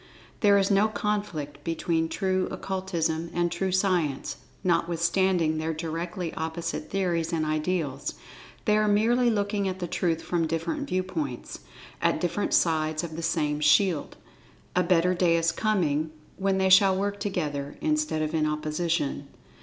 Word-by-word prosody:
There 205 -1 +5
is 195 0 +2
no 200 +2 +4
conflict 190 -10 -3
between 165 0 0
True 185 0 0
Occultism 170 -4 -2
and 175 0 +1
True 185 +2 -1
Science, 180 -7 0 0.3
notwithstanding 170 -1 +1
their 160 0 -2
directly 165 +2 -4
opposite 160 +1 -4
theories 175 -4 0
and 160 -2 0
ideals—they 155 - -3
are 215 0 +2
merely 235 +4 +3
looking 205 -2 0
at 185 -1 -3
the 180 - -3
Truth 170 -1 -1
from 170 -2 0
different 175 - -2
viewpoints—at 175 -9 -3
different 175 +3 0
sides 155 -1 +1
of 160 -2 -6
the 165 - -4
same 155 -3 0
shield. 150 +3 +3 0.6
A 180 - +4
better 180 0 +3
day 175 -2 +3
is 165 0 +2
coming, 165 -6 0 0.3
when 195 0 0
they 190 0 +2
shall 190 0 +6
work 200 +1 -2
together, 150 -8 -3
instead 305 - 0
of 155 +1 -3
in 155 -1 +2
opposition. 150 -1 -1
170 Hz, 140 wpm, -27 LUFS, 160-190 Hz, 0.6 s, shall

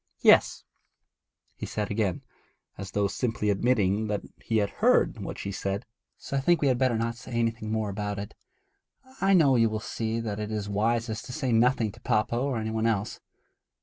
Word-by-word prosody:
'Yes,' - - +5 0.9
he - - -7
said 105 -1 -3
again, 100 -5 -1 0.5
as 100 - -7
though 100 -1 +2
simply 110 -1 -1
admitting 105 -1 +1
that 105 -1 -2 0.2
he 115 - 0
had 100 -2 +1
heard - - +3
what - - -6
she 100 - -4
said. 100 +3 -3 0.3
'So 140 - -4
I - - +3
think 170 +5 +3
we 145 - +2
had 125 -2 +1
better 130 -3 +2
not 115 +1 -1
say 125 - -10
anything 115 -2 -1
more 110 -2 -1
about 105 0 -3
it. 100 0 -6 0.9
I 195 0 +4
know 145 -7 +5
you 115 -1 +4
will 110 0 -3
see 110 +1 -3
that 110 -2 -4
it 105 0 -3
is 105 -2 -3
wisest 110 +2 -1
to 125 - -7
say 130 0 -1
nothing 115 -1 +3
to - - -17
papa 110 +2 +1
or 130 +1 0
any 110 0 -3
one 110 +1 0
else. 110 -2 -1
110 Hz, 195 wpm, -27 LUFS, 105-120 Hz, 0.9 s, Yes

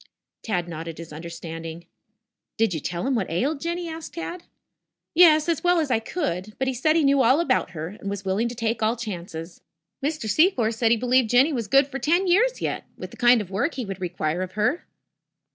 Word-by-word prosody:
Tad 180 -6 -2
nodded 165 -1 -6
his 165 -2 -9
understanding. 165 0 -7 0.7
"Did 220 -4 +2
you 160 - -2
tell 175 - -4
him 270 - +1
what 220 -7 -1
ailed 275 - -1
Jinny?" 340 +1 -3
asked 320 -1 -8
Tad. 345 +1 -6 0.7
"Yes, 315 -2 +6
as 335 -1 0
well 355 -1 +4
as 300 -5 -1
I 225 - +3
could. 215 - -4
But 265 - -1
he 265 - 0
said 310 +6 +2
he 330 - +3
knew 275 -1 +4
all 260 +5 +4
about 185 - +1
her, 160 +2 -4
and 200 0 -7
was 200 -1 -5
willing 195 +5 +1
to 240 - -7
take 230 -1 -2
all 220 +2 +2
chances. 175 -7 -7 0.4
Mr. 300 -5 -2
Secor 240 - +3
said 225 0 +1
he 235 - +4
believed 250 0 +2
Jinny 265 +6 +4
was 235 -5 -2
good 275 +5 +5
for 275 -1 -6
ten 340 +9 +2
years 450 +8 +2
yet, - - -2
with - - -8
the - - -11
kind 240 -1 +5
of 195 -2 -9
work 255 - -1
he 255 - -3
would 195 -2 -7
require 175 -1 -2
of 185 0 -5
her." 215 +11 0
230 Hz, 215 wpm, -24 LUFS, 185-300 Hz, 0.7 s, Yes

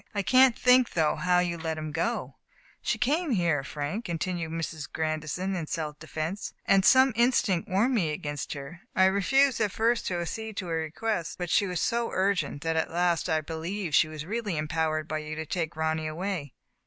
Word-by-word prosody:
I 200 - 0
can't 255 +2 +5
think, 250 0 +4
though, 160 -3 +2
how 180 0 +2
you 175 -1 0
let 160 -1 -3
him 155 -1 -4
go. 230 +10 -2 0.2
" - - -30
She - - 0
came 300 +7 +1
here, 170 -8 +1
Frank, 150 - -4
continued 170 0 -2
Mrs. 160 -2 -4
Grandison, 155 +4 -2
in 165 -4 -3
self 150 -2 -4
defense, 160 +5 -4
" - - -43
and 195 -1 +4
some 260 +4 +6
instinct 235 -7 +2
warned 215 +8 +2
me 185 -10 +1
against 145 -1 -4
her. 145 +4 -9
I 190 - +5
refused 235 +7 +3
at 210 -2 +1
first 230 +3 +1
to 175 -2 -1
ac 170 - -2
cede 220 -2 -6
to 185 - -3
her 165 - 0
request, 170 +3 -3
but 175 -2 -4
she 200 - +3
was 180 -2 -2
so 235 0 0
urgent 190 -6 0
that 165 0 0
at 160 - 0
last 175 0 +1
I 155 -1 +2
believed 165 +3 -4
she 155 - +5
was 155 -1 -7
really 210 -3 -2
empowered 155 0 -1
by 155 0 -2
you 155 0 -6
to 160 0 -4
take 165 0 -3
Ronny 160 0 -1
away. 165 -3 -4
170 Hz, 205 wpm, -28 LUFS, 155-205 Hz, 0.2 s, some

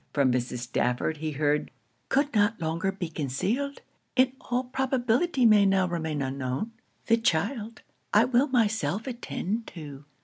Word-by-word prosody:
From 140 -3 +3
Mrs. 125 0 -2
Stafford 125 +5 -1
he 155 0 -3
heard 150 +1 +1 0.4
'Could 285 +2 +2
not 210 0 +2
longer 165 +4 -1
be 190 -2 -4
concealed 185 - -2 0.3
in 255 0 +4
all 245 +1 -1
probability 260 +2 +1
may 215 -2 +7
now 195 -1 +3
remain 160 -4 -2
unknown 130 - -3 0.3
the 230 - +4
child, 225 - -1 0.3
I 210 +3 +5
will 250 +3 +3
myself 225 -4 +1
attend 235 -3 -3
to.' 145 -4 -9
200 Hz, 140 wpm, -27 LUFS, 150-245 Hz, 0.4 s, may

